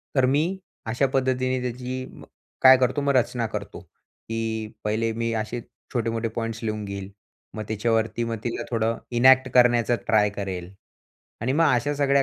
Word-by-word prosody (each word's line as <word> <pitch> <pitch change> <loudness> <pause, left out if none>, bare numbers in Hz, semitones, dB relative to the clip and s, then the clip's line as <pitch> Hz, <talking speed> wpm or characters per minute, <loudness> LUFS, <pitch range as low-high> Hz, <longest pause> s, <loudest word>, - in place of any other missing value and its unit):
तर 130 -2 +4
मी 140 +4 +3 0.5
अशा 125 +4 +2
पद्धतीने 130 -1 +1
त्याची 125 +1 -4
मग - - -13 0.4
काय 130 0 +10
करतो, 130 +3 +1
मग 140 0 +2
रचना 120 -1 +1
करतो, - - -6
की 110 -1 -6
पहिले 110 +2 0
मी 115 +1 -2
असे 115 +3 -4 0.3
छोटे-मोठे 115 -1 -1
पॉईंट्स 115 0 -3
लिहून 110 -1 -2
घेईल. 100 -1 -6 0.4
मग 110 - -4
त्याच्यावरती 115 +1 0
मग 115 0 -3
तिला 120 - -2
थोडं 115 -1 0 0.2
इनॅक्ट 130 +1 +6
करण्याचा 120 -1 +5
ट्राय 105 -2 +3
करेल 95 -3 -5 0.7
आणि 120 +3 0
मग 165 +4 +3
अशा 145 +5 0
सगळ्या 140 -1 +3
115 Hz, 155 wpm, -25 LUFS, 110-130 Hz, 0.7 s, काय